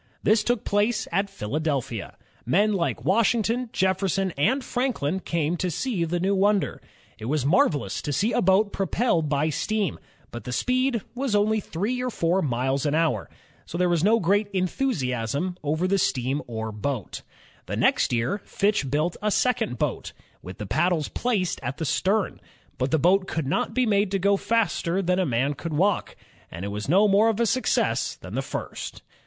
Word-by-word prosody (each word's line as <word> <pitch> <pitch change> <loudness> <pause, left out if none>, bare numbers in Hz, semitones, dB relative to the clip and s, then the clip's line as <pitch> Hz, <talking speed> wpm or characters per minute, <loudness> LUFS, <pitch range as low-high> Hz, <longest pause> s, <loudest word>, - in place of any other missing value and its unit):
This 215 0 +4
took 240 -1 0
place 215 +2 +1
at 195 +3 0
Philadelphia. 135 - -3 0.3
Men 205 - +2
like 175 -4 -1
Washington, 230 +4 +2
Jefferson, 190 0 +1
and 255 - +1
Franklin 245 - -1
came 170 -2 -1
to 180 - -1
see 180 - -1
the 175 +2 -1
new 190 +3 +1
wonder. 200 +1 +1 0.4
It 110 - -7
was 140 +2 0
mar 155 +7 +5
velous 145 - -4
to 145 - -3
see 205 - +1
a - - +2
boat 195 +3 +3
propelled 190 -4 0
by 150 +2 +1
steam, 200 +3 -1 0.3
but 120 - -7
the 125 - -6
speed 250 - +1
was 250 -3 -1
only 215 +1 +3
three 210 +7 -2
or 250 - -1
four 180 -3 +1
miles 130 -1 0
an 145 - +1
hour, 155 -10 0 0.4
so 170 - -5
there 180 0 +2
was 170 -2 +1
no 225 +4 +4
great 200 +3 +2
enthusiasm 175 - -1
over 155 +5 0
the 195 +1 +2
steam 135 -1 0
oar 110 -2 -4
boat. 105 +1 -4 0.5
The - - -3
next - - +2
year, 125 - 0
Fitch 200 -9 0
built 155 +5 0
a 210 - +1
second 215 - +1
boat, - - -2 0.3
with 90 +1 -9
the 105 - -5
paddles 170 - +1
placed 210 -8 -1
at 140 - -4
the 160 - -3
stern. 195 +6 0 0.4
But 130 +1 0
the 160 - +2
boat 185 +5 +3
could 160 - -2
not 180 +10 -1
be 255 0 +3
made 205 -2 +2
to 195 - 0
go 200 +2 +3
faster 195 -4 0
than 180 +1 +1
a 185 - +1
man 130 +3 +1
could 160 +3 -6
walk, 190 +6 +1 0.3
and 85 +4 -6
it - - -3
was 105 +4 -5
no 195 +6 +5
more 205 +3 +4
of 225 -1 -1
a 235 - +3
success 255 +3 +1
than - - -11
the - - 0
first. - - -6
185 Hz, 185 wpm, -25 LUFS, 145-210 Hz, 0.5 s, mar